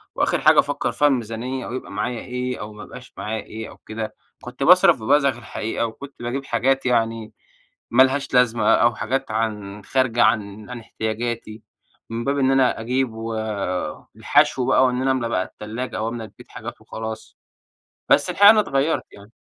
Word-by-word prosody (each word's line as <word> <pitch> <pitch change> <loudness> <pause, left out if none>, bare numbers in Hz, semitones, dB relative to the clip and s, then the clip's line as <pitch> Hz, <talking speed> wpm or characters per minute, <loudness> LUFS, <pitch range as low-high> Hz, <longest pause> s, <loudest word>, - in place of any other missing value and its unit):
وآخر - - +1
حاجة - - +6
أفكر - - 0
فيها 145 - +3
الميزانية 125 0 -2
أو - - -6
يبقى 130 - -6
معايا 120 -2 -3
إيه 125 0 -4
أو 105 +1 -7
ما 105 0 -10
يبقاش - - -12
معايا 110 +1 -4
إيه 110 +1 -8
أو - - -14
كده. 110 0 -6 0.3
كنت - - -6
باصرف - - +6
ببذخ 140 0 +3
الحقيقة 115 +1 -3
وكنت 135 +5 -9
باجيب 130 +3 -3
حاجات 135 +3 +1
يعني 115 -2 0 0.6
ما 130 +2 +7
لهاش 135 +1 -1
لازمة 125 -2 +4
أو 120 +1 +3
حاجات 130 0 -2
عن 105 -2 -3
خارجة 130 -3 +2
عن 105 0 0
عن 125 -1 -6
احتياجاتي 110 0 -4 0.5
من 115 +1 -3
باب 140 +2 0
إن 135 -1 +3
أنا 135 -3 +3
أجيب 125 +1 -1
والحشو 110 +5 -1
بقى، 130 - +4
وإن 125 0 0
أنا 135 0 +2
املا 130 -3 0
بقى 95 -5 0
التلاجة 115 +6 -6
أو 110 - -2
املا 115 -1 -5
البيت 105 - -16
حاجات - - -9
وخلاص، 110 0 -7 0.7
بس - - +4
الحقيقة 205 0 +8
أنا 215 0 +6
اتغيَّرت 150 -4 0
يعني. 100 +2 -15
120 Hz, 175 wpm, -22 LUFS, 110-130 Hz, 0.7 s, الحقيقة